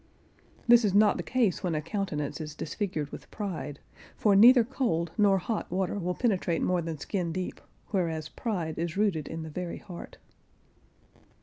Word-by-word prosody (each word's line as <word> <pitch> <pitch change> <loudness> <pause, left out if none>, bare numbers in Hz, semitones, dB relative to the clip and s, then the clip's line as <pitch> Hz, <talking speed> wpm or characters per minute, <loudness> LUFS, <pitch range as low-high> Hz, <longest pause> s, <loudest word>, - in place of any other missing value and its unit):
This 240 0 +7
is 200 -2 +1
not 210 0 +5
the - - -2
case 240 -8 +1
when 180 -5 -1
a - - +1
countenance 155 -5 -3
is 150 -1 -6
disfigured 160 -4 -3
with - - -10
pride, 180 -8 -5 0.4
for 205 -2 +4
neither 240 +4 +8
cold 175 - -1
nor 200 -2 +4
hot 215 +4 -3
water 190 +2 -1
will 180 0 -2
penetrate 190 -8 0
more 180 -1 +2
than 165 -1 -4
skin 175 +2 -2
deep, 185 +2 -4 0.3
whereas 165 -5 -1
pride 170 -9 -3
is 170 +1 -2
rooted 195 -8 +1
in 160 0 -5
the 160 - -7
very 175 +2 -4
heart. 180 -5 -10
180 Hz, 170 wpm, -29 LUFS, 160-205 Hz, 0.4 s, neither